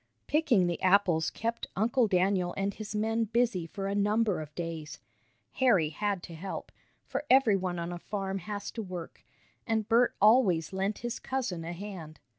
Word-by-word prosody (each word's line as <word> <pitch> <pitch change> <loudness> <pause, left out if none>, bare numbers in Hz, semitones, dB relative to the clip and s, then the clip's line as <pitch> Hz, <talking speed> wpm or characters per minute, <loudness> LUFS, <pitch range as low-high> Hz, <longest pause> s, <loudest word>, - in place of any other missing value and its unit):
Picking 290 - +3
the 175 -1 -2
apples 185 -4 +3
kept 230 +1 -3
Uncle 230 +3 +2
Daniel 185 -2 +1
and 195 +1 -1
his 215 0 -7
men 225 +2 +1
busy 225 -6 0
for 195 +4 -5
a 195 - -1
number 205 -2 +1
of 150 -1 -10
days. 160 -3 -5 0.5
Harry 205 - +3
had 195 +3 -2
to 170 - -9
help, 185 +4 -6 0.3
for - - -3
everyone 195 -9 +4
on 170 +1 -3
a 175 - -6
farm 195 0 -3
has 205 +2 -5
to 230 - -5
work, 180 -5 -8 0.4
and 220 -2 0
Bert 240 +2 +3
always 195 -7 +4
lent 195 +2 -1
his 240 0 -3
cousin 235 -11 -3
a 165 - -5
hand. 175 -5 -8
195 Hz, 170 wpm, -30 LUFS, 175-225 Hz, 0.5 s, everyone